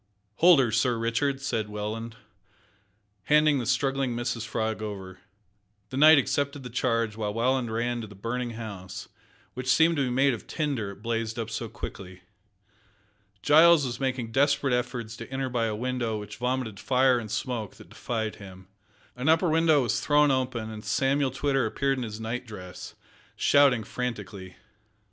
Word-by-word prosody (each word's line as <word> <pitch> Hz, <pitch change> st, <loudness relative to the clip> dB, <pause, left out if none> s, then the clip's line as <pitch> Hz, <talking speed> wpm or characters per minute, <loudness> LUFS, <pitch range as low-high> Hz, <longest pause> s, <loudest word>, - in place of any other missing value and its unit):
"Hold 175 Hz, -3 st, +7 dB
her, 125 Hz, -4 st, +2 dB
Sir 120 Hz, +2 st, +1 dB
Richard," 115 Hz, +5 st, 0 dB
said 110 Hz, -6 st, -2 dB
Welland, 110 Hz, +2 st, -5 dB, 1.1 s
handing 150 Hz, -1 st, +4 dB
the 120 Hz, -, -4 dB
struggling 135 Hz, 0 st, 0 dB
Mrs 120 Hz, -1 st, -3 dB
Frog 110 Hz, -1 st, -2 dB
over. 95 Hz, -3 st, -7 dB, 0.7 s
The 130 Hz, -, -4 dB
knight 155 Hz, +2 st, +8 dB
accepted 140 Hz, +1 st, 0 dB
the 125 Hz, -, -8 dB
charge, 115 Hz, -3 st, 0 dB
while 105 Hz, -1 st, -3 dB
Welland 125 Hz, 0 st, +1 dB
ran 120 Hz, +1 st, -1 dB
to 110 Hz, -, -7 dB
the 105 Hz, -, -13 dB
burning 120 Hz, +4 st, -3 dB
house, 95 Hz, -5 st, -8 dB, 0.4 s
which 130 Hz, +1 st, -6 dB
seemed 165 Hz, +3 st, +4 dB
to 140 Hz, -, +2 dB
be 130 Hz, -, -1 dB
made 135 Hz, +2 st, +3 dB
of 115 Hz, -, -8 dB
tinder, 140 Hz, -10 st, -2 dB
it 100 Hz, +1 st, -12 dB
blazed 115 Hz, -1 st, -2 dB
up 115 Hz, -1 st, -4 dB
so 115 Hz, 0 st, -4 dB
quickly. 95 Hz, -4 st, -9 dB, 1.2 s
Giles 160 Hz, 0 st, +6 dB
was 120 Hz, -1 st, -4 dB
making 130 Hz, -4 st, -2 dB
desperate 140 Hz, 0 st, +2 dB
efforts 125 Hz, -2 st, -2 dB
to 115 Hz, +2 st, -9 dB
enter 135 Hz, 0 st, -2 dB
by 120 Hz, -2 st, 0 dB
a 110 Hz, -, -2 dB
window 120 Hz, -1 st, -2 dB
which 105 Hz, -1 st, -8 dB
vomited 125 Hz, -4 st, -2 dB
fire 130 Hz, -1 st, +3 dB
and 110 Hz, -2 st, -7 dB
smoke 110 Hz, -1 st, -3 dB
that -, -, -15 dB
defied 110 Hz, -3 st, -4 dB
him. 95 Hz, -2 st, -12 dB, 0.5 s
An 125 Hz, +5 st, -1 dB
upper 165 Hz, +2 st, +4 dB
window 160 Hz, -3 st, +4 dB
was 115 Hz, -, 0 dB
thrown 150 Hz, -1 st, +4 dB
open, 125 Hz, -4 st, -2 dB
and 105 Hz, -1 st, -8 dB
Samuel 135 Hz, +5 st, +1 dB
Twitter 135 Hz, -1 st, 0 dB
appeared 135 Hz, +3 st, -1 dB
in -, -, -3 dB
his 110 Hz, -1 st, -6 dB
night 115 Hz, +2 st, -4 dB
dress, 90 Hz, -4 st, -9 dB, 0.4 s
shouting 140 Hz, -5 st, +4 dB
frantically. 105 Hz, -6 st, -6 dB
120 Hz, 165 wpm, -27 LUFS, 110-135 Hz, 1.2 s, knight